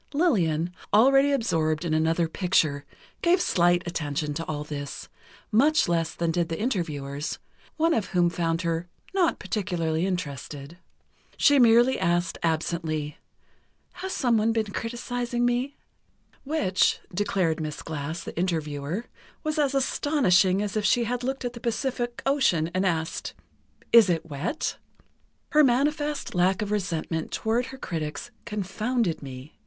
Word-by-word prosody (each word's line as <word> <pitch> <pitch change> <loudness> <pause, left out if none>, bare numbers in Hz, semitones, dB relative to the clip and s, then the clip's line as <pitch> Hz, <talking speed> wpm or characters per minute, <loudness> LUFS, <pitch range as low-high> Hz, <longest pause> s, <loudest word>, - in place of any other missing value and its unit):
Lillian, 175 - +2 0.2
already 270 +6 +5
absorbed 165 - 0
in 160 - 0
another 165 +2 +2
picture, 160 -5 +1 0.4
gave 350 +2 +4
slight 175 - +3
attention 150 -3 -2
to 165 +3 -3
all 150 -1 -3
this; 145 -1 -6 0.4
much 290 +8 +4
less 165 -2 0
than 170 -1 0
did 170 0 0
the 165 - -3
interviewers, 150 - -2 0.4
one 330 +1 +3
of 215 - 0
whom 175 -2 +2
found 165 0 -1
her 165 +1 -1 0.3
"not 365 -4 +2
particularly 180 -4 -1
interested." 150 -2 -5 0.6
She 285 -1 +5
merely 240 +2 +5
asked 175 -1 0
absently: 160 -2 -2 0.7
"Has 380 - -5
someone 230 -6 +2
been 220 -2 -1
criticizing 240 +1 -2
me?" 245 +3 0 0.7
Which, 235 -11 +2
declared 180 -4 0
Miss 155 -1 -5
Glass, 160 +1 -4
the - - -8
interviewer, 160 +2 -2 0.4
was 310 0 -1
as 280 -2 +2
astonishing 205 - +3
as 205 0 -4
if 215 - 0
she 240 +3 +3
had 245 +1 -2
looked 265 0 -2
at 245 - -3
the 235 - -8
Pacific 240 +1 -2
Ocean 180 - +2
and 185 +1 +1
asked: 160 -2 -2 0.6
"Is 230 -5 +8
it 165 -1 0
wet?" 165 - -3 0.7
"Her 305 0 +5
manifest 290 +3 +1
lack 185 +3 +2
of 205 - -4
resentment 165 -5 -2
toward 235 +3 0
her 265 - -9
critics 160 - -5
confounded 210 -1 -1
me.... 135 +1 -9
185 Hz, 140 wpm, -26 LUFS, 160-245 Hz, 0.7 s, Is